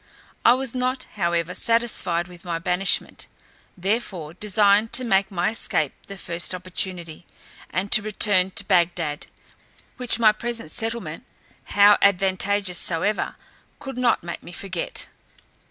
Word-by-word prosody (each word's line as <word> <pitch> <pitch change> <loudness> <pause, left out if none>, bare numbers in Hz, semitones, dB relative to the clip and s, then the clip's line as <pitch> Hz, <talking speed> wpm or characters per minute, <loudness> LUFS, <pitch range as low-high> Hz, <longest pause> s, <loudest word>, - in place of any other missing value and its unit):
I 235 - +7
was 260 -1 -3
not, 255 +1 -1
however, 170 -2 -1
satisfied 195 -7 +2
with 175 -1 -14
my 170 -2 -3
banishment, 180 +2 -1 0.5
therefore 185 -5 -3
designed 205 +2 +2
to 255 - 0
make 195 -4 +2
my 185 +1 0
escape 155 -9 -1
the 195 - -9
first 175 0 -2
opportunity, 180 -2 -4 0.4
and 190 +3 -3
to - - +7
return 205 -3 +2
to 195 - -2
Bagdad; 170 -5 0 0.7
which 250 -3 +1
my 225 -2 +6
present 225 -6 -6
settlement, 225 +4 -2 0.4
how 205 0 +5
advantageous 195 -1 +1
soever, 180 +5 -1 0.4
could 270 -3 -7
not 240 -7 +2
make 170 -1 -6
me - - -11
forget. 185 -1 -4
195 Hz, 130 wpm, -23 LUFS, 175-215 Hz, 0.7 s, I